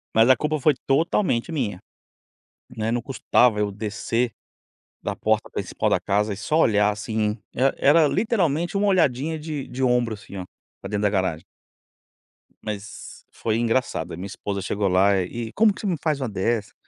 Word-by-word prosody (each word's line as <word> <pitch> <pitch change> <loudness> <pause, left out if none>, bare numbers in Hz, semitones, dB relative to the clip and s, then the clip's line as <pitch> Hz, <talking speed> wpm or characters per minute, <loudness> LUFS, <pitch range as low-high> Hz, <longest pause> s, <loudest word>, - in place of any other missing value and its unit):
Mas 115 +3 +5
a 130 - +8
culpa 155 +1 -1
foi 150 +2 +4
totalmente 160 - +1
minha. 115 - -2 1.0
Não 110 -2 -3
é 110 - 0
não 120 0 0
custava 125 -3 +2
eu 105 -1 0
descer, 110 +3 -2 0.7
da - - -3
porta - - 0
principal - - -2
da - - +3
casa 105 +1 0
e - - -5
só 130 +10 0
olhar 105 -8 +4
assim, 105 0 -2 0.2
era 135 +2 +2
era 150 +2 +5
literalmente 175 -4 0
uma 205 - +2
olhadinha 160 -5 +2
de 150 -3 -5
de 130 +1 -5
ombro 120 -3 +2
assim 100 -1 -11
ó, 95 - -5 0.4
para 95 - -7
dentro 105 0 -1
da 105 - +3
garagem. 95 -5 -1 1.2
Mas 105 -1 -7
foi 110 - -2
engraçado, 115 -7 -1
a 80 - -6
minha 95 - -6
esposa 100 0 -4
chegou 100 +1 -1
lá 95 +2 +4
e 115 +5 -5
como 215 -1 +4
que - - -10
você 205 - -2
me 175 - 0
faz 155 -3 0
uma 130 - -2
dessa? 105 +2 -1
115 Hz, 180 wpm, -24 LUFS, 105-150 Hz, 1.2 s, a